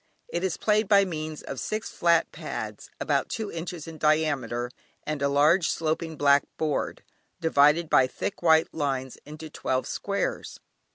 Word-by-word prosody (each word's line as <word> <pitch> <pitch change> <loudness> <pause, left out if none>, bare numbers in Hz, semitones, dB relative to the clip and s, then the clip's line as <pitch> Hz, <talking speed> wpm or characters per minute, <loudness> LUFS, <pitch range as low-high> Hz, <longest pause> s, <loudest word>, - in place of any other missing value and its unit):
It 175 - -3
is 190 -3 -1
played 215 0 +2
by 200 -1 +5
means 155 -3 -5
of 135 - -6
six 215 +1 -3
flat 170 -1 +2
pads, - - -6
about - - 0
two 220 -3 -4
inches 165 -1 -6
in 160 -1 -9
diameter, 140 -6 +1 0.3
and 150 -2 -3
a 140 - +2
large 155 +5 +4
sloping 160 0 -2
black 140 0 +5 0.2
board, 155 -2 -2 0.4
divided 160 +1 +4
by 130 -3 +4
thick 190 - -5
white 160 -2 +4
lines 135 -4 -2
into 155 +1 -8
twelve 130 -3 -1
squares. 200 0 -3
155 Hz, 155 wpm, -26 LUFS, 145-170 Hz, 0.4 s, by